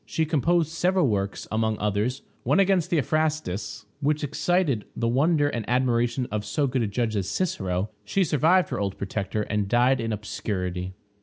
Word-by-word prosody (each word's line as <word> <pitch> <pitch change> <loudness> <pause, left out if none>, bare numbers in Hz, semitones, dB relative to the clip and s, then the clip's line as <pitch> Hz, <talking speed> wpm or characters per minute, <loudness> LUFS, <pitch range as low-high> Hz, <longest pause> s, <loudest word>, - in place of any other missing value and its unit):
She 160 - -1
composed 160 +2 +1
several 180 0 +2
works; 100 -3 -2
among 110 0 0
others, 105 +6 -1 0.2
one - - +2
against 190 -3 +3
Theophrastus, 155 - -1
which 150 +1 0
excited 150 - 0
the 115 - -1
wonder 145 +5 +3
and 120 -5 -2
admiration 120 0 +1
of 105 -1 -2
so 140 +7 0
good 130 -1 0
a 110 - +1
judge 110 +2 -1
as 95 -2 -1
Cicero. 95 - -1
She 190 - +1
survived 165 +4 +3
her - - -3
old 100 -2 -2
protector, 100 +2 -2
and 105 -1 -1
died 125 +3 +3
in 115 0 -2
obscurity. 95 -3 -3
120 Hz, 165 wpm, -25 LUFS, 105-155 Hz, 0.2 s, against